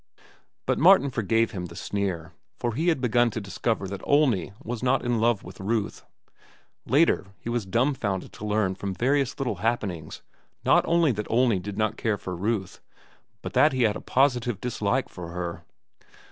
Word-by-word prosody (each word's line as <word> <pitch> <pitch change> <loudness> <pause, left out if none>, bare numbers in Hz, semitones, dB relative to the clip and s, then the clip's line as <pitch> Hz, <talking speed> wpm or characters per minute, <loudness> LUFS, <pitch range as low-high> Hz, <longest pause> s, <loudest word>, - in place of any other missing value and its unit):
But - - +1
Martin 165 -4 +6
forgave 115 0 +1
him 90 -3 -5
the 85 - -12
sneer, 95 -5 -3 0.3
for 120 -1 -2
he 160 +9 -1
had 160 -7 +2
begun 120 -1 +3
to 115 - -4
discover 100 +1 -2
that 100 0 -6
Olney 130 - +2
was 120 0 -4
not 130 +1 +1
in 120 -2 +1
love 115 -2 +2
with - - -11
Ruth. 105 +2 -2 0.8
Later, 140 - +3
he - - -7
was 120 -5 -2
dumfounded 115 -4 0
to - - -11
learn 105 -3 +1
from 95 0 -5
various 135 +5 +1
little 135 -3 -2
happenings 100 -9 -2 0.4
not - - +5
only 170 -3 +4
that 105 -2 -4
Olney 115 -4 +3
did 100 +2 -6
not 110 -2 0
care 110 -2 0
for 90 -1 -6
Ruth, 100 +1 -2 0.6
but - - -5
that - - +5
he 130 -1 +1
had 105 -2 +2
a - - -6
positive 125 -5 +1
dislike 125 +2 -1
for 90 -2 -8
her. 85 -1 -5
115 Hz, 175 wpm, -26 LUFS, 100-125 Hz, 0.8 s, Martin